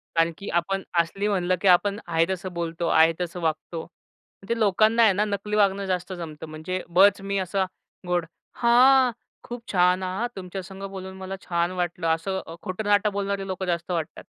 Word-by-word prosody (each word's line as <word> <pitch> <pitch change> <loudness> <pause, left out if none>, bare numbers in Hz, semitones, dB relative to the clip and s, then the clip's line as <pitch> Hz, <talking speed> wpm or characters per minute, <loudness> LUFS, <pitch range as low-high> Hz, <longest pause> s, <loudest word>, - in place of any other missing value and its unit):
कारण 165 0 +3
की 200 - -7
आपण 195 +3 0 0.2
असली 195 +5 0
म्हणलं, 185 -3 +1
की 200 - +1
आपण 200 +3 +4
आहे 165 -1 +2
तसं 185 -1 -4
बोलतो 170 0 -3
आहे 160 +1 +5
तसं 180 0 -4
वागतो. 160 0 -2 0.6
ते 235 - +1
लोकांना 215 +2 +4
आहे 215 -3 +6
ना, 205 +3 +1
नकली 210 0 -3
वागणं 200 -1 +2
जास्त 185 0 -2
जमतं. 160 -4 -7
म्हणजे 155 +4 -4
बळच 195 +3 +5
मी 200 0 -2
असा 190 +1 0 0.4
गोड, 175 -1 +1 0.3
हां, 250 +2 +5 0.3
खूप 240 0 -7
छान 180 0 +3
हां 185 +6 -2
तुमच्या 190 0 -6
संग 195 +1 -10
बोलून 190 -1 -8
मला 190 0 -5
छान 170 0 -1
वाटलं. 175 -2 -2
असं 165 +4 0
अ, 165 - -9
खोटं 185 +3 -4
नाटं 205 0 +3
बोलणारे 200 -1 -2
लोकं 190 0 -3
जास्त 170 0 -2
वाटतात. 165 -3 -3
185 Hz, 185 wpm, -25 LUFS, 170-200 Hz, 0.6 s, आहे